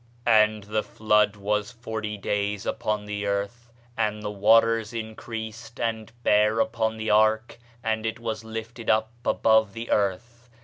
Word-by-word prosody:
"And 110 Hz, -1 st, +4 dB
the 105 Hz, +1 st, -1 dB
flood 105 Hz, -1 st, +2 dB
was 105 Hz, +1 st, -1 dB
forty 110 Hz, -2 st, -5 dB
days 100 Hz, 0 st, -2 dB
upon 105 Hz, -1 st, -2 dB
the 105 Hz, 0 st, -3 dB
earth; 100 Hz, +4 st, -3 dB, 0.2 s
and 105 Hz, -1 st, -1 dB
the 105 Hz, -, -3 dB
waters 115 Hz, +2 st, +3 dB
increased, 110 Hz, +1 st, -7 dB
and 110 Hz, -2 st, -2 dB
bare 105 Hz, +1 st, +3 dB
up -, -, 0 dB, 0.2 s
the 110 Hz, 0 st, -1 dB
ark, 110 Hz, +2 st, +3 dB, 0.2 s
and 110 Hz, -1 st, -1 dB
it 115 Hz, +1 st, -3 dB
was 110 Hz, -1 st, -4 dB
lifted 110 Hz, +1 st, -6 dB
up 110 Hz, +1 st, +2 dB
above 110 Hz, -4 st, +3 dB
the 115 Hz, +2 st, -6 dB
earth. 115 Hz, +5 st, -1 dB
110 Hz, 145 wpm, -26 LUFS, 105-115 Hz, 0.2 s, And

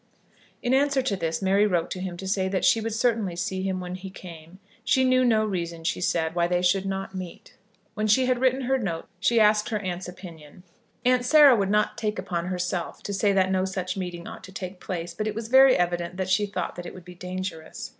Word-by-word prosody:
In 245 Hz, 0 st, +1 dB
answer 275 Hz, 0 st, +2 dB
to 220 Hz, -6 st, 0 dB
this 165 Hz, 0 st, -2 dB
Mary 200 Hz, +2 st, +3 dB
wrote 175 Hz, -4 st, 0 dB
to 185 Hz, -, -4 dB
him 180 Hz, -1 st, -5 dB
to 190 Hz, +2 st, -7 dB
say 190 Hz, -1 st, 0 dB
that 190 Hz, -1 st, 0 dB
she 225 Hz, -, +4 dB
would 220 Hz, 0 st, -3 dB
certainly 225 Hz, -6 st, 0 dB
see 185 Hz, +2 st, -3 dB
him 190 Hz, -1 st, -2 dB
when 180 Hz, 0 st, -6 dB
he 185 Hz, +1 st, -7 dB
came. 170 Hz, -2 st, -12 dB, 0.3 s
She 260 Hz, -, +3 dB
knew 255 Hz, 0 st, +4 dB
no 220 Hz, -3 st, +3 dB
reason, 170 Hz, -5 st, -4 dB
she 170 Hz, -, -1 dB
said, 165 Hz, -2 st, 0 dB
why 170 Hz, 0 st, +1 dB
they 180 Hz, 0 st, 0 dB
should 190 Hz, +2 st, +2 dB
not 195 Hz, 0 st, -4 dB
meet. 185 Hz, -2 st, -8 dB, 0.4 s
When 215 Hz, 0 st, -1 dB
she 255 Hz, +5 st, +4 dB
had 250 Hz, -1 st, +1 dB
written 260 Hz, 0 st, +2 dB
her 265 Hz, +1 st, +1 dB
note 170 Hz, -8 st, -4 dB
she 230 Hz, +3 st, +3 dB
asked 210 Hz, 0 st, +4 dB
her 220 Hz, -, -1 dB
aunt's 185 Hz, -3 st, -4 dB
opinion. 170 Hz, -3 st, -12 dB, 0.4 s
Aunt 250 Hz, 0 st, +3 dB
Sarah 285 Hz, 0 st, +7 dB
would 200 Hz, -3 st, 0 dB
not 210 Hz, +1 st, +1 dB
take 210 Hz, -1 st, -2 dB
upon 180 Hz, -2 st, -3 dB
herself 180 Hz, -1 st, -3 dB
to 200 Hz, -, -4 dB
say 200 Hz, +1 st, +2 dB
that 190 Hz, -1 st, +2 dB
no 185 Hz, 0 st, +1 dB
such 185 Hz, -1 st, -3 dB
meeting 175 Hz, -3 st, -5 dB
ought -, -, -9 dB
to 190 Hz, -, -12 dB
take 185 Hz, -1 st, -7 dB
place, 175 Hz, -2 st, -5 dB
but 215 Hz, +5 st, -3 dB
it 215 Hz, -, -3 dB
was 225 Hz, 0 st, -5 dB
very 265 Hz, +1 st, +7 dB
evident 175 Hz, 0 st, -1 dB
that 190 Hz, -1 st, -2 dB
she 205 Hz, +2 st, +2 dB
thought 205 Hz, -, -4 dB
that 175 Hz, 0 st, -6 dB
it -, -, -9 dB
would 180 Hz, -2 st, -12 dB
be 180 Hz, -, -10 dB
dangerous. 180 Hz, -2 st, -6 dB
190 Hz, 235 wpm, -25 LUFS, 180-215 Hz, 0.4 s, Sarah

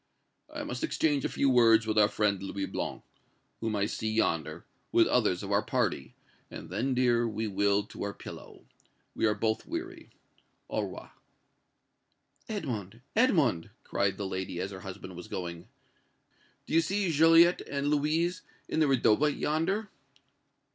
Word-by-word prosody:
"I -, -, -5 dB
must -, -, -5 dB
exchange 150 Hz, -, +1 dB
a -, -, 0 dB
few 140 Hz, -, +1 dB
words 115 Hz, -3 st, +5 dB
with 110 Hz, -1 st, -1 dB
our 105 Hz, -, +6 dB
friend 105 Hz, -2 st, 0 dB
Louis 95 Hz, 0 st, -3 dB
Blanc, -, -, -4 dB, 0.6 s
whom 110 Hz, -1 st, -2 dB
I 100 Hz, -1 st, +1 dB
see 110 Hz, +1 st, -3 dB
yonder, 85 Hz, -8 st, -1 dB, 0.3 s
with -, -, +5 dB
others 90 Hz, +2 st, +1 dB
of 100 Hz, -, -5 dB
our 100 Hz, +1 st, +3 dB
party, 65 Hz, -10 st, -2 dB, 0.3 s
and -, -, -9 dB
then, 130 Hz, +2 st, -1 dB
dear, 120 Hz, -2 st, +3 dB
we 110 Hz, 0 st, -3 dB
will 100 Hz, 0 st, +2 dB
to -, -, -11 dB
our 100 Hz, -, -2 dB
pillow. -, -, -11 dB, 0.5 s
We -, -, +1 dB
are 105 Hz, -, +1 dB
both 110 Hz, +1 st, -1 dB
weary. 340 Hz, 0 st, -6 dB, 0.6 s
Au -, -, 0 dB
revoir!" -, -, -7 dB, 1.4 s
"Edmond 120 Hz, -, -4 dB
Edmond!" 155 Hz, -, +3 dB
cried 100 Hz, -1 st, 0 dB
the 100 Hz, -, -3 dB
lady, 95 Hz, -2 st, -4 dB
as 95 Hz, +2 st, -3 dB
her 95 Hz, -, -8 dB
husband 95 Hz, -1 st, -8 dB
was 90 Hz, -, -9 dB
going, 85 Hz, -1 st, -6 dB, 1.0 s
"do -, -, -7 dB
you 165 Hz, -, +6 dB
see 195 Hz, +1 st, 0 dB
Joliette 165 Hz, +3 st, +6 dB
and 140 Hz, 0 st, -1 dB
Louise 155 Hz, +4 st, +1 dB, 0.3 s
in -, -, -1 dB
the 155 Hz, -, +4 dB
redowa 135 Hz, +1 st, +3 dB
yonder?" 165 Hz, +9 st, -1 dB
115 Hz, 155 wpm, -29 LUFS, 100-155 Hz, 1.4 s, our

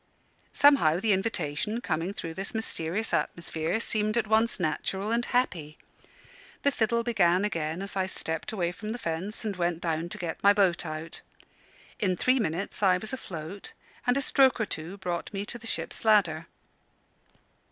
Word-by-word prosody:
Somehow, 180 Hz, -, +5 dB
the 210 Hz, +1 st, +3 dB
invitation, 195 Hz, 0 st, -1 dB
coming 170 Hz, -3 st, -2 dB
through 165 Hz, -5 st, -6 dB
this 195 Hz, +5 st, -2 dB
mysterious 220 Hz, -1 st, -1 dB
atmosphere, 170 Hz, +3 st, -1 dB
seemed 215 Hz, -1 st, +1 dB
at 230 Hz, -, +2 dB
once 220 Hz, +1 st, +2 dB
natural 190 Hz, +5 st, -1 dB
and 235 Hz, +1 st, +2 dB
happy. 175 Hz, -13 st, -1 dB, 0.9 s
The 280 Hz, -, +4 dB
fiddle 235 Hz, -2 st, +1 dB
began 195 Hz, -5 st, +3 dB
again 165 Hz, -2 st, -2 dB
as 200 Hz, -, -6 dB
I 190 Hz, -1 st, +1 dB
stepped 160 Hz, -3 st, -3 dB
away 175 Hz, -5 st, -1 dB
from 215 Hz, +4 st, -5 dB
the -, -, -4 dB
fence 190 Hz, +3 st, -3 dB
and 205 Hz, -2 st, -2 dB
went 175 Hz, -2 st, 0 dB
down 165 Hz, 0 st, -2 dB
to 210 Hz, -, -6 dB
get 175 Hz, -4 st, -4 dB
my 200 Hz, 0 st, +7 dB
boat 185 Hz, -4 st, +2 dB
out. 155 Hz, +1 st, -6 dB, 0.8 s
In 185 Hz, -3 st, +1 dB
three 255 Hz, +6 st, +3 dB
minutes 195 Hz, -1 st, -2 dB
I 185 Hz, -2 st, +5 dB
was 220 Hz, +6 st, -7 dB
afloat, 185 Hz, -5 st, -7 dB, 0.3 s
and 245 Hz, +2 st, +4 dB
a -, -, +2 dB
stroke 265 Hz, -1 st, +4 dB
or 220 Hz, -, +1 dB
two 170 Hz, +1 st, -5 dB
brought 175 Hz, -3 st, -3 dB
me 200 Hz, 0 st, -3 dB
to 240 Hz, -, -7 dB
the 230 Hz, -, -9 dB
ship's -, -, -4 dB
ladder. 180 Hz, -7 st, +3 dB
195 Hz, 170 wpm, -28 LUFS, 170-220 Hz, 0.9 s, my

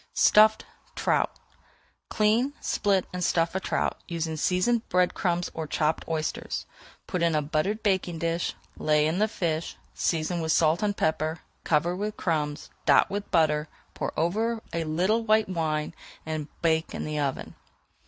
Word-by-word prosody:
STUFFED 215 Hz, +1 st, +5 dB, 0.3 s
TROUT -, -, +1 dB, 0.8 s
Clean, 225 Hz, +6 st, +2 dB
split, 195 Hz, -3 st, +1 dB
and 180 Hz, 0 st, -2 dB
stuff 165 Hz, -1 st, +1 dB
a 190 Hz, -, 0 dB
trout, -, -, -1 dB
using 165 Hz, -2 st, -3 dB
seasoned 185 Hz, +9 st, +2 dB, 0.3 s
crumbs 175 Hz, -1 st, -1 dB
or 160 Hz, -1 st, -4 dB
chopped 155 Hz, +1 st, 0 dB
oysters. 160 Hz, -1 st, -3 dB, 0.4 s
Put 180 Hz, -5 st, -3 dB
in 170 Hz, -2 st, +2 dB
a 150 Hz, -, +2 dB
buttered 165 Hz, +9 st, -1 dB
baking 190 Hz, -4 st, +1 dB
dish, 165 Hz, +1 st, -1 dB, 0.2 s
lay 150 Hz, -1 st, +2 dB
in 160 Hz, +4 st, 0 dB
the 215 Hz, -, +3 dB
fish, 165 Hz, -6 st, -2 dB, 0.2 s
season 165 Hz, +1 st, -1 dB
with 160 Hz, 0 st, 0 dB
salt 160 Hz, +3 st, +3 dB
and 205 Hz, -1 st, 0 dB
pepper, 160 Hz, +1 st, 0 dB, 0.2 s
cover 165 Hz, +3 st, +1 dB
with 210 Hz, +3 st, -3 dB
crumbs, 150 Hz, -4 st, -2 dB, 0.2 s
dot -, -, +5 dB
with 205 Hz, +1 st, -4 dB
butter, 150 Hz, -2 st, +2 dB, 0.2 s
pour -, -, -3 dB
over 220 Hz, +7 st, 0 dB
a 165 Hz, -1 st, -1 dB
little 185 Hz, +9 st, +1 dB
white 220 Hz, -1 st, +3 dB
wine, 155 Hz, -3 st, -1 dB, 0.3 s
and 155 Hz, -2 st, -3 dB, 0.2 s
bake 160 Hz, -1 st, +1 dB
in -, -, -4 dB
the 150 Hz, 0 st, -2 dB
oven. 140 Hz, -2 st, -2 dB
170 Hz, 155 wpm, -27 LUFS, 155-200 Hz, 0.8 s, STUFFED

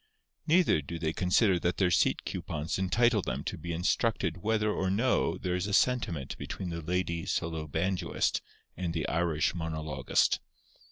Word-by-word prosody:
Neither 165 Hz, -, +4 dB
do 80 Hz, +4 st, -6 dB
they 80 Hz, -1 st, -1 dB
consider 90 Hz, +1 st, +3 dB
that 90 Hz, +2 st, 0 dB
their 90 Hz, -3 st, +2 dB
seat -, -, +2 dB
coupons 75 Hz, +5 st, -3 dB
entitle 110 Hz, +3 st, +3 dB
them -, -, -3 dB
to -, -, -3 dB
be 85 Hz, +2 st, -6 dB
instructed 90 Hz, +1 st, 0 dB
whether 105 Hz, 0 st, +1 dB
or 95 Hz, -2 st, -1 dB
no 115 Hz, +7 st, +1 dB
there 90 Hz, -1 st, -2 dB
is 90 Hz, +2 st, -1 dB
a 105 Hz, -, -3 dB
sentiment 110 Hz, -, +1 dB
between 95 Hz, -, -5 dB
the 85 Hz, 0 st, -4 dB
lady 85 Hz, 0 st, -1 dB
solo 80 Hz, -2 st, -2 dB
banjoist 90 Hz, +5 st, 0 dB, 0.3 s
and 85 Hz, -2 st, -3 dB
the 80 Hz, -, -1 dB
Irish 80 Hz, -2 st, +1 dB
monologist. 80 Hz, -3 st, 0 dB
90 Hz, 160 wpm, -30 LUFS, 80-100 Hz, 0.3 s, Neither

